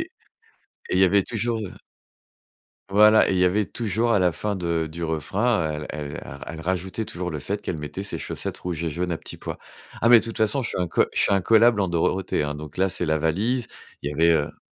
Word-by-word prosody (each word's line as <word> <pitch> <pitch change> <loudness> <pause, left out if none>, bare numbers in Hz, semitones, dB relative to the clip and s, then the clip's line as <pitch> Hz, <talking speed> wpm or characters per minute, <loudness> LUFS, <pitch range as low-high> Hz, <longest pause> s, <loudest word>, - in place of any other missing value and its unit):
et - - -3 0.8
et - - 0
il - - +3
y 95 - +6
avait 100 +1 +4
toujours 115 0 -2
heu 90 - -9 1.2
Voilà, 105 +2 +6
et 95 - +1
il - - +1
y 90 - +4
avait 100 +4 +2
toujours 115 +1 0
à 105 - +4
la 90 -2 +3
fin 100 +4 -3
de 85 -3 -1
du 85 +1 -5
refrain, 80 +1 0
heu, - - -6
elle 75 -1 -6
ra 70 +2 -10
elle 80 0 -7
rajoutait 95 +5 -2
toujours 90 -1 -5
le 75 - -4
fait 100 +8 -3
qu'elle 85 - -3
mettait 75 +5 -6
ses 100 - -4
chaussettes - - -5
rouges 85 -2 -4
et 80 - -1
jaunes 90 +3 -2
à 80 - -2
petits - - -8
pois. - - -6 0.4
Ah, 115 - +5
mais 120 -1 +9
de - - -2
toute 115 -1 -5
façon, 110 +5 +2
je - - -3
suis - - -4
incolle 90 -2 +2
je - - 0
suis - - +3
incollable 110 +3 +4
en 95 - +2
Dorothée, 85 +1 0
hein, 75 0 -3
donc 75 -1 -9
là, 95 +1 +2
c'est 90 -2 -2
la 80 - +2
valise. 110 +10 0 0.3
Il 70 - -2
y - - -4
avait, 85 +3 +3
heu 75 -3 -1
90 Hz, 245 wpm, -24 LUFS, 80-105 Hz, 1.2 s, mais